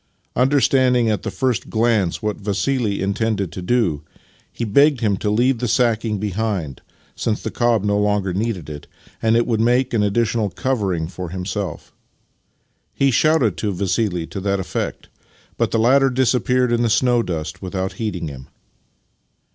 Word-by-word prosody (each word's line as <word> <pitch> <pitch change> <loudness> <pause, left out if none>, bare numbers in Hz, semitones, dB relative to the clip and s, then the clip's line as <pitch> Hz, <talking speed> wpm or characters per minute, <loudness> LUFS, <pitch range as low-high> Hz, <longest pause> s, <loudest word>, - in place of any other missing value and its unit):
Understanding 130 -3 +3
at 105 - -1
the - - -4
first 130 -4 -1
glance 110 -6 +1
Vv 110 - -10
hat 105 - -5
Vassili 105 +1 -1
intended 100 -2 -1
to 90 - -7
do, 90 -7 +1 0.5
he - - -5
begged 140 +5 +4
him 105 -3 +2
to 105 - -2
leave 120 +4 +2
the 125 - -1
sacking 115 -2 +1
behind, 100 - -3 0.3
since 110 -1 -1
the - - -5
cob 120 -4 +1
no 105 0 +1
longer 105 -2 0
needed 100 -4 -2
it 75 -1 -8 0.3
and 115 +1 +3
it 120 - +2
would 115 -3 0
make 120 +2 +2
an 110 - +2
additional 110 +1 +1
covering 95 -10 -1
for 90 0 -7
himself. 95 0 -5 1.0
He 135 0 +2
shouted 135 - +2
to 105 - -1
Vassili 95 -2 -1
to 100 - -7
that 100 0 -1
effect, 95 - -4 0.5
but - - 0
the - - 0
latter 135 +4 +4
disappeared 125 0 +1
in 120 0 +2
the 120 - +2
snow 120 +2 +3
dust 85 -2 -5
without 95 0 -3
heeding 95 -7 -3
him. 65 -3 -9
110 Hz, 165 wpm, -20 LUFS, 95-120 Hz, 1.0 s, begged